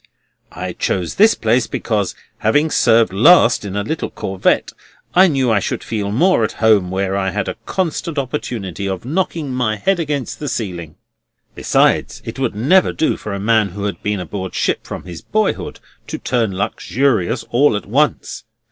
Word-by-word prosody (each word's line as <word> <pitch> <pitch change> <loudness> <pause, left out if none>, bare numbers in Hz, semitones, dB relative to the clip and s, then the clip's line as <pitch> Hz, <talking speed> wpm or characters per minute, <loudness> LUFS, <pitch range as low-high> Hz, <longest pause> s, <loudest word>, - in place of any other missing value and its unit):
I - - -5
chose 90 -3 -2
this 215 +3 +5
place, 115 +1 +1
because, 105 -5 -2 0.2
having 145 +8 +2
served 115 -3 +3
last 120 - +5
in 100 -1 -5
a 105 - -1
little 160 +9 -3
corvette, 95 -1 0 0.4
I 185 +2 +6
knew 135 -7 +1
I 105 - +3
should - - -3
feel 105 -3 -3
more 165 - +3
at 110 - -1
home 105 -5 +3
where 95 +1 -1
I 95 -1 0
had 90 - -3
a - - -2
constant 170 -3 -2
opportunity 115 - -3
of 95 +2 -4
knocking 160 -2 -2
my 120 -4 0
head 180 - 0
against 145 -5 -3
the 145 - -3
ceiling. 85 -9 -5 0.6
Besides, - - +1
it - - -6
would 125 -5 -1
never 155 - +3
do 160 - 0
for 105 - -7
a - - -4
man 110 0 +2
who 100 +3 -7
had 100 -4 -3
been 105 -1 -1
aboard 95 +1 -5
ship - - -1
from - - -6
his 85 -2 -9
boyhood 215 -1 -1 0.3
to - - -4
turn 115 -7 -1
luxurious 115 0 0
all 130 -1 +3
at - - -7
once. 145 +8 0
110 Hz, 175 wpm, -18 LUFS, 100-145 Hz, 0.6 s, I